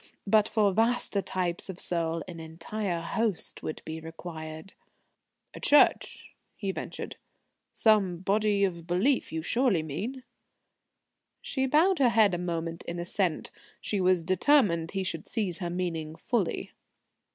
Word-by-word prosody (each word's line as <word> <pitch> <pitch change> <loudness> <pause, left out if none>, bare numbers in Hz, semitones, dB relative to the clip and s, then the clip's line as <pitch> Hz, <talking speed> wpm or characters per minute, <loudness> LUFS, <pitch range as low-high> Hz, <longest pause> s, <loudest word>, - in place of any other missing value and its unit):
But 215 +1 +4
for 205 -3 +2
vaster 225 -1 +2
types 180 -1 -3
of 185 -1 -6
soul 165 -2 -1
an 170 -2 -8
entire 170 +3 -4
host 205 +2 -1
would 155 - -5
be 160 0 -5
required." 160 +1 -8 0.8
"A - - -9
church?" 290 - +3 0.2
he 195 -2 -2
ventured. - - -6 0.6
"Some 205 -5 +3
Body 200 +2 +1
of 170 -3 -1
belief, 205 +10 +1
you 160 0 -3
surely 230 -5 +2
mean?" 220 - -5 1.2
She 265 -1 -1
bowed 325 +6 +4
her 255 -3 +5
head 220 -4 +4
a 175 - -1
moment 165 -1 -3
in 170 - -4
assent. 175 0 -1 0.3
She 205 -2 -2
was 185 -2 +3
determined 185 - +3
he 195 0 -2
should 165 -3 -3
seize 200 -7 -2
her 175 -3 -3
meaning 165 -3 -3
fully. 215 0 -1
185 Hz, 140 wpm, -28 LUFS, 165-215 Hz, 1.2 s, her